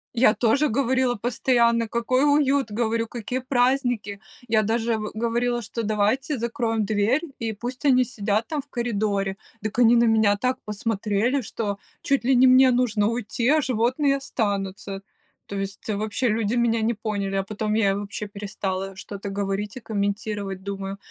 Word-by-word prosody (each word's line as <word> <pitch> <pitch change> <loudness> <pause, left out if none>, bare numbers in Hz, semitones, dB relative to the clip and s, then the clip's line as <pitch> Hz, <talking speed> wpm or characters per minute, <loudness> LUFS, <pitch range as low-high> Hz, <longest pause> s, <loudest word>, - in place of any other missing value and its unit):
Я 230 -2 +5
тоже 255 +6 +2
говорила 260 0 +1
постоянно, 235 0 +2
какой 250 +4 +1
уют! 280 -4 +3
Говорю, 230 +1 -1
какие 240 +2 -4
праздники! 245 -5 0 0.3
Я 220 -1 +3
даже 225 +1 0
в 215 0 -5
говорила, 235 +2 0
что 230 +2 -5
давайте 220 +7 0
закроем 230 -2 -1
дверь, 215 - +1 0.2
и 225 -2 -2
пусть 245 +6 -6
они 255 -2 +5
сидят 215 -2 -1
там 300 -3 -2
в 280 - -25
коридоре! 205 -5 -1 0.3
Так 215 +2 -3
они 240 0 +6
на 235 - +5
меня 220 -3 +4
так 255 +5 -1
посмотрели, 215 +4 0
что 205 -2 -3 0.2
чуть 275 -3 0
ли 260 0 +4
не 255 +2 +6
мне 255 0 +7
нужно 225 -4 +2
уйти, 235 +1 -2
а 310 0 +4
животные 260 +4 +1
останутся. 200 -6 -3 0.4
То 200 - -7
есть 195 +2 -5
вообще 215 +4 -1
люди 220 0 0
меня 235 -1 +2
не 225 +2 +1
поняли, 205 -3 -3
а 195 - +1
потом 215 +2 -3
я 215 -3 +3
и - - +1
вообще 205 +1 -5
перестала 195 -1 -4
что-то 200 +1 -7
говорить 200 +2 -3
и - - -5
комментировать. 200 -2 -3
Думаю, 195 0 -5
225 Hz, 165 wpm, -24 LUFS, 205-245 Hz, 0.4 s, мне